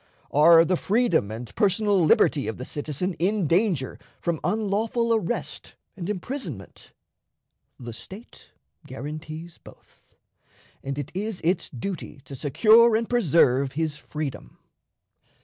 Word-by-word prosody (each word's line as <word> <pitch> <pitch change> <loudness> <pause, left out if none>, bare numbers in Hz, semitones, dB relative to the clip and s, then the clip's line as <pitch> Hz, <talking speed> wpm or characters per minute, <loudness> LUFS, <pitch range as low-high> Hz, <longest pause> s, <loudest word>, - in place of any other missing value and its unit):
Are 165 +3 +7
the 185 +1 +1
freedom 195 - +1
and 115 +2 -7
personal 205 -2 +2
liberty 155 -2 +3
of 110 - -4
the 125 - -6
citizen 150 +6 -3
in 195 +2 +1
danger 170 - +1 0.2
from 170 -2 -2
unlawful 220 +2 0
arrest 220 +1 -3 0.2
and 175 -1 -6
imprisonment? 185 - -6 0.9
The 120 -2 -7
State 190 - -12 0.4
guarantees 155 +5 -8
both, - - -19 0.7
and 135 0 -4
it 145 +2 -5
is 205 +1 -3
its 170 +1 0
duty 150 +2 -6
to - - -10
secure 215 - +5
and 225 +1 0
preserve 140 - +3
his 155 0 -2
freedom. 145 - -6
170 Hz, 120 wpm, -25 LUFS, 145-210 Hz, 0.9 s, Are